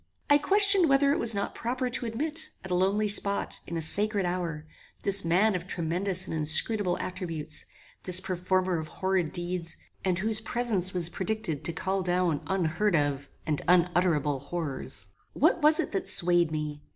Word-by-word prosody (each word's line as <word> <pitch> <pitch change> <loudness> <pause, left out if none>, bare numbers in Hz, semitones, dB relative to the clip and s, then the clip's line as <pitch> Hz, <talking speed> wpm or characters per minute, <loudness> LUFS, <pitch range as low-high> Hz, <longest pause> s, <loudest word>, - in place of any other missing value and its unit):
I 290 - +6
questioned 395 0 +4
whether 280 +1 +3
it - - -2
was 230 -2 +7
not 200 - -3
proper 250 +2 -3
to 245 0 -3
admit, 310 +8 -2 0.2
at 190 - -8
a - - 0
lonely 195 +4 +1
spot, 200 0 +1
in 170 - -5
a 165 - -1
sacred 205 +4 +1
hour, 170 -3 -4 0.4
this 200 0 +3
man 185 +6 +2
of 180 -1 -5
tremendous 180 +2 +1
and - - -5
inscrutable 175 +5 +3
attributes, 165 -5 -3 0.3
this 180 0 +3
performer 185 -1 -1
of 155 - -6
horrid 185 -3 -2
deeds, 175 -1 -3 0.3
and 185 -2 0
whose 220 +3 -2
presence 220 -5 0
was 175 -3 +2
predicted 190 -5 -4
to - - -1
call 190 +3 -3
down 175 -4 -1
unheard 185 +2 0
of 145 -2 -2 0.2
and 150 -2 -2
unutterable 175 -5 +1
horrors. 140 -1 -5 0.2
What 340 - +1
was 305 +1 +4
it - - -2
that 195 - -1
swayed 175 -2 +4
me? 150 -1 -5
185 Hz, 170 wpm, -27 LUFS, 165-210 Hz, 0.4 s, was